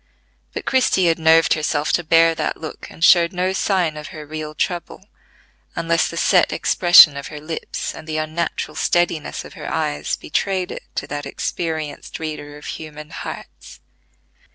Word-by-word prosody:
But - - -5
Christie 250 -8 +2
had 165 - 0
nerved 160 0 +5
herself 150 -1 -1
to 175 - +2
bear 165 +1 +5
that - - -2
look, 155 - -8
and 165 - -8
showed 170 -1 +6
no 185 +1 0
sign 185 -5 0
of 150 - -7
her 155 -1 -9
real 155 0 -6
trouble, 175 +3 -3 0.7
unless 165 0 +1
the 170 - -7
set 180 +1 +3
expression 175 -4 +6
of 140 - -6
her 150 - -8
lips, 160 +2 -5
and 155 - -11
the 155 0 -3
unnatural 155 +2 -3
steadiness 175 -3 0
of - - -12
her - - -7
eyes 75 +1 -1
betrayed 190 -2 -2
it - - -6
to - - -2
that 145 -1 -5
experienced 155 -3 -4
reader 150 -2 -6
of 150 - -13
human 150 -1 -8
hearts. - - -9
160 Hz, 165 wpm, -20 LUFS, 150-175 Hz, 0.7 s, showed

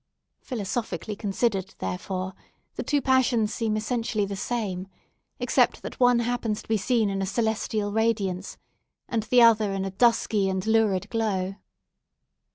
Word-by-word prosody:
Philosophically 215 - -3
considered, 200 -2 -1
therefore, 185 - -4 0.4
the - - -4
two 290 -2 0
passions 245 -5 +2
seem 220 -2 -1
essentially 225 -1 -1
the 200 0 -5
same, 195 -4 -3 0.5
except - - +2
that - - -7
one 245 -1 +5
happens 235 -3 -2
to - - -22
be 225 - +2
seen 225 +1 +1
in 195 -1 -2
a - - 0
celestial 220 -1 -1
radiance, 205 -4 0 0.5
and 230 -2 0
the 245 +3 +4
other 220 -3 +5
in 195 0 -2
a 195 - -3
dusky 210 -1 +2
and 190 0 -2
lurid 220 -4 +2
glow. 195 -5 -1
215 Hz, 145 wpm, -26 LUFS, 195-230 Hz, 0.5 s, one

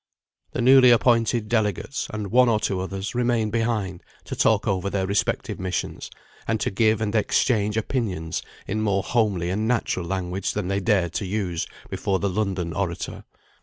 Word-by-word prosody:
The - - -1
newly 130 0 +7
appointed 115 -1 +3
delegates, 110 +3 -1
and 105 -3 -4
one 125 0 +5
or 110 -2 +2
two 95 -3 -1
others, 95 +2 -4
remained 120 -3 +1
behind 110 -6 -1 0.2
to - - -6
talk - - +2
over 95 0 0
their 100 -1 -1
respective 100 +2 -1
missions, 95 -1 -3 0.4
and 110 -1 0
to - - 0
give 110 +2 +2
and 105 -1 -1
exchange 105 -1 +1
opinions 100 -9 -2 0.2
in 110 +2 -2
more 100 -3 +1
homely 100 -7 0
and 105 +3 -1
natural 110 -7 0
language 95 0 -2
than 100 -3 -2
they 100 0 +1
dared 95 -4 +1
to 100 - -2
use 90 -4 -2 0.2
before 95 - 0
the 100 - -1
London 95 -4 -2
orator. - - -4
105 Hz, 165 wpm, -24 LUFS, 95-115 Hz, 0.4 s, newly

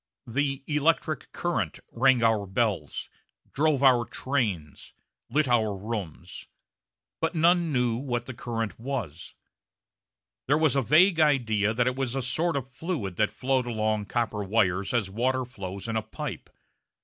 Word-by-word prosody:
The 135 +3 -1
"electric 155 +1 0
current" 115 - -2
rang 125 -1 +3
our 110 -3 +2
bells, 95 -7 -1 0.5
drove 145 -1 +2
our 125 -3 +6
trains, 105 - -3 0.3
lit 145 +3 +2
our 110 -5 +2
rooms, 95 -5 -6 0.7
but 165 +2 -1
none 170 0 +3
knew 125 -4 +1
what 120 -2 -3
the 130 - -6
current 115 -2 -4
was. 115 - -5 1.1
There 145 +3 +4
was 155 -4 +3
a 135 - +3
vague 165 - +5
idea 115 -9 +3
that 120 +1 +2
it 125 0 0
was 135 -2 -2
a 135 - -1
sort 160 +6 0
of 135 -1 -3
fluid 130 - -4
that 105 - +3
flowed 130 -1 0
along 110 -2 0
copper 110 -2 -1
wires 95 -2 +1
as 110 -6 0
water 130 +4 0
flows 100 -4 -7
in 115 - -2
a 110 - +1
pipe. 110 - -7
120 Hz, 150 wpm, -27 LUFS, 110-140 Hz, 1.1 s, our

